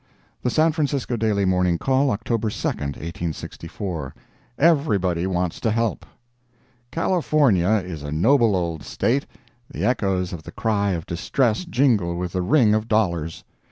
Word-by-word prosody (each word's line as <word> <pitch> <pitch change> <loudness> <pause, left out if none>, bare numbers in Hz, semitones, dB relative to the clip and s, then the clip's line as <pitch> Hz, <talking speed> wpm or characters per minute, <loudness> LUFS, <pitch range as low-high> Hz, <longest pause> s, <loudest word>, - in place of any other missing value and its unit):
The 125 - 0
San 160 +5 +3
Francisco 145 -5 -1
Daily 105 -3 +1
Morning 90 -2 +2
Call, 135 +7 +2
October 115 0 -1
2, - - -3
1864 80 +2 -5 0.4
EVERYBODY 100 - +2
WANTS 90 -2 -1
TO 115 - 0
HELP 115 -4 -1 0.8
California 150 - +2 0.2
is 85 -5 -6
a 75 0 -6
noble 115 - +3
old 85 -4 -2
State. 130 - -1 0.4
The - - -3
echoes 95 -7 0
of 85 - -6
the - - -10
cry 100 -3 0
of 85 -2 -4
distress 110 - 0
jingle 120 - +2
with 90 0 -3
the 90 - -1
ring 110 +1 +4
of 110 +1 0
dollars. 85 -8 0
100 Hz, 140 wpm, -23 LUFS, 85-125 Hz, 0.8 s, ring